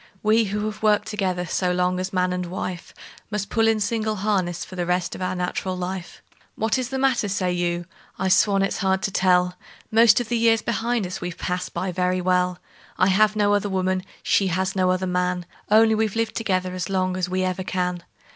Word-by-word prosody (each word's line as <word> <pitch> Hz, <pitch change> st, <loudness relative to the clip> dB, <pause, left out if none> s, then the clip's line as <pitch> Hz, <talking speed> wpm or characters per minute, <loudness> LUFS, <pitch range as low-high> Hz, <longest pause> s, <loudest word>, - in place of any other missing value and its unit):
We, 220 Hz, +1 st, +4 dB
who 210 Hz, +1 st, -2 dB
have 215 Hz, 0 st, -5 dB
worked 210 Hz, -1 st, +2 dB
together 185 Hz, -4 st, -1 dB
so 180 Hz, +1 st, 0 dB
long 180 Hz, 0 st, +1 dB
as 185 Hz, +1 st, -3 dB
man 180 Hz, -1 st, +1 dB
and 180 Hz, -1 st, -3 dB
wife, 180 Hz, 0 st, -5 dB, 0.4 s
Must 210 Hz, -2 st, -3 dB
pull 225 Hz, -1 st, +3 dB
in 225 Hz, -1 st, +3 dB
single 215 Hz, 0 st, -1 dB
harness 185 Hz, -4 st, -1 dB
for 185 Hz, -, -11 dB
the 175 Hz, -1 st, -2 dB
rest 180 Hz, 0 st, 0 dB
of -, -, -8 dB
our 185 Hz, 0 st, -1 dB
nat'ral 180 Hz, +1 st, -2 dB
life. 180 Hz, 0 st, -6 dB, 0.3 s
"What 220 Hz, +4 st, 0 dB
is 250 Hz, -1 st, -3 dB
the 265 Hz, -, -3 dB
matter?" 260 Hz, -5 st, +2 dB
say 185 Hz, -2 st, 0 dB
you. 175 Hz, 0 st, -1 dB, 0.3 s
I 190 Hz, -, -1 dB
swan 195 Hz, +1 st, +4 dB
it's 195 Hz, -, -1 dB
hard 190 Hz, -1 st, +1 dB
to -, -, -1 dB
tell! 180 Hz, -2 st, +3 dB, 0.4 s
Most 225 Hz, +1 st, +6 dB
of 245 Hz, -, -3 dB
the 235 Hz, 0 st, 0 dB
years 225 Hz, -1 st, +3 dB
behind 235 Hz, -1 st, -1 dB
us 180 Hz, -, -6 dB
we've 180 Hz, -1 st, -5 dB
passed 180 Hz, 0 st, -3 dB
by 185 Hz, +2 st, -2 dB
very 180 Hz, +1 st, 0 dB
well; 180 Hz, 0 st, +1 dB, 0.4 s
I 185 Hz, -, +4 dB
have 210 Hz, +3 st, +3 dB
no 205 Hz, -1 st, +3 dB
other 205 Hz, 0 st, +1 dB
woman, 185 Hz, -1 st, 0 dB, 0.2 s
she 195 Hz, -, +2 dB
has 190 Hz, +2 st, -1 dB
no 185 Hz, -1 st, +2 dB
other 185 Hz, 0 st, +1 dB
man 180 Hz, -1 st, -1 dB, 0.2 s
Only 220 Hz, +1 st, +5 dB
we've 220 Hz, -1 st, 0 dB
lived 225 Hz, -1 st, -1 dB
together 185 Hz, -4 st, -1 dB
as 185 Hz, +1 st, -4 dB
long 185 Hz, -1 st, 0 dB
as 185 Hz, -1 st, -2 dB
we 185 Hz, 0 st, 0 dB
ever 185 Hz, 0 st, -2 dB
can. 180 Hz, -1 st, -2 dB
185 Hz, 215 wpm, -23 LUFS, 180-210 Hz, 0.4 s, Most